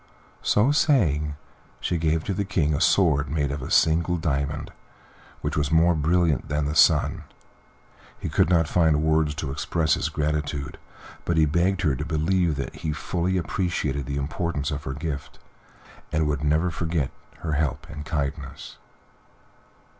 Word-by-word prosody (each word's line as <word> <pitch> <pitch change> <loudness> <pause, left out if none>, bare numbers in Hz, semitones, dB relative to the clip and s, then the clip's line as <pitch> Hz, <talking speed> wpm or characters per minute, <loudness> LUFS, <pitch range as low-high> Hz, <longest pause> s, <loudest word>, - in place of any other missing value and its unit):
So 110 +7 +3
saying, 80 - +2 0.4
she 85 - -1
gave 80 0 +1
to 100 - -2
the 100 - -1
King 85 -6 0
a 75 - -1
sword 75 -10 +3
made 70 -1 0
from 70 0 -4
a - - -6
single 85 +2 +3
diamond, 70 -3 -2 0.7
which - - -2
was 75 -1 0
more 85 +2 +5
brilliant 80 -2 +1
than 75 0 0
the 75 - -1
sun. 75 - +4 0.9
He - - -5
could - - +2
not 85 -3 +3
find 80 -3 +2
words 80 -1 +2
to 75 -3 -4
express 80 +2 0
his - - 0
gratitude, 75 -2 -2 0.4
but 85 - 0
he 80 - +5
begged 90 +5 +1
her 75 -5 +2
to - - -4
believe 80 +1 +1
that 70 - -5
he 80 -2 -3
fully 90 +4 -1
appreciated 75 -5 -2
the 70 0 -3
importance 75 0 -2
of 75 0 -5
her 65 - -3
gift, 70 0 -5 0.7
and 80 0 +1
would 75 -1 -1
never 80 +4 +2
forget 80 -4 -1 0.3
her 80 - -3
help 70 -3 -1
and 75 0 -7
kindness. 70 -3 -4
75 Hz, 160 wpm, -25 LUFS, 75-85 Hz, 0.9 s, more